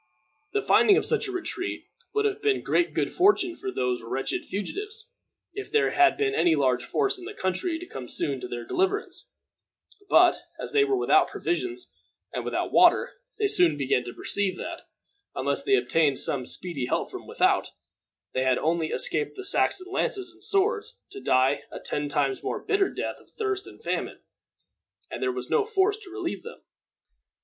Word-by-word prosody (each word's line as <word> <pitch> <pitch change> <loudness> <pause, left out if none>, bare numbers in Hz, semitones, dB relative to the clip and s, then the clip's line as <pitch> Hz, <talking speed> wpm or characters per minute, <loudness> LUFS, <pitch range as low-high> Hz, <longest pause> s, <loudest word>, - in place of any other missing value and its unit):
The 415 -1 0
finding 405 -1 +5
of - - +1
such 455 -2 +1
a - - -4
retreat 370 +1 -4 0.3
would 430 0 0
have 420 0 -1
been 415 0 +1
great 345 - +1
good - - 0
fortune 370 -2 +3
for 400 - -5
these 125 - -1
wretched 120 +4 -3
fugitives 420 - -5 0.4
if 405 0 -7
there 440 +1 +3
had 355 -1 +4
been 415 -1 +1
any 170 - +3
large 130 -4 +1
force 400 - 0
in 360 - -10
the 415 +2 -8
country 190 - -1
to 350 - -8
come 130 - -8
soon 135 +2 -2
to - - -5
their 120 -1 -6
deliverance; 390 - -1 0.8
but, - - +6 0.2
as - - -5
they 425 -1 +4
were 405 -1 +1
without 385 - +4
provisions 360 +1 -3 0.5
and - - -3
without - - -2
water, - - +5 0.2
they 425 - +2
soon 170 - +4
began 135 -3 +1
to 120 - -7
perceive 200 -2 0
that, - - -7 0.5
unless - - -1
they 405 - +3
obtained 155 - +2
some 130 -3 +1
speedy 155 -9 -1
help - - -1
from - - -8
without, - - +2 0.6
they 130 - 0
had 130 -1 +2
only 160 0 0
escaped 155 -1 -1
the 390 - -7
Saxon 375 -1 +2
lances 385 -2 0
and 350 - -12
swords 420 +3 +1
to 400 0 -8
die 130 +2 +3
a - - -7
ten 145 0 -3
times 140 -3 0
more - - -3
bitter 400 -1 +1
death - - -4
of - - -22
thirst 410 -3 -3
and - - -14
famine; - - -3 0.9
and - - -5
there 390 - +1
was 385 +1 -5
no 455 - +4
force 410 -1 +1
to 410 -4 -13
relieve 360 -2 -4
them. 470 - -11
370 Hz, 185 wpm, -26 LUFS, -, 0.9 s, but